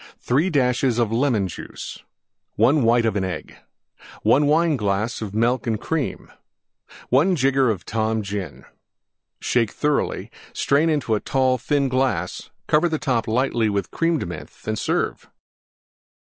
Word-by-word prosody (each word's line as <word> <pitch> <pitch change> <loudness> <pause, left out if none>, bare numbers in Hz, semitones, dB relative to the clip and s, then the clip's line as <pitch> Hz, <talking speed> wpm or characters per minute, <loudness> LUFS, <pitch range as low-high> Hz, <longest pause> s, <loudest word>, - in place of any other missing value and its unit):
3 145 +9 +1
dashes 125 -4 +1
Lemon 115 -2 +1
Juice. 90 - -8 0.6
1 145 +3 +4
white 115 0 +3
of 110 -3 0
an 100 - 0
Egg. 90 -4 -5 0.7
1 135 +7 +4
Wineglass 120 -10 +1
Milk 120 +4 0
and 110 -2 0
Cream. 155 -1 -3 0.8
1 160 +9 +4
jigger 135 - +2
Tom 110 0 -1
Gin. 100 -5 -6 0.7
Shake 115 -3 +1
thoroughly; 150 -1 -1 0.2
strain 150 +4 +2
into 130 -9 +1
tall, 130 0 +1
thin 140 +3 +1
glass; 130 -9 -1 0.2
cover 155 +3 +3
the 160 - -1
top 125 -6 -1
lightly 115 -1 +1
with 100 -3 -2
Creme 165 0 +1
de - - -3
Menthe 85 -3 -9
and 110 0 -1
serve. - - -2
125 Hz, 130 wpm, -22 LUFS, 110-140 Hz, 0.8 s, 1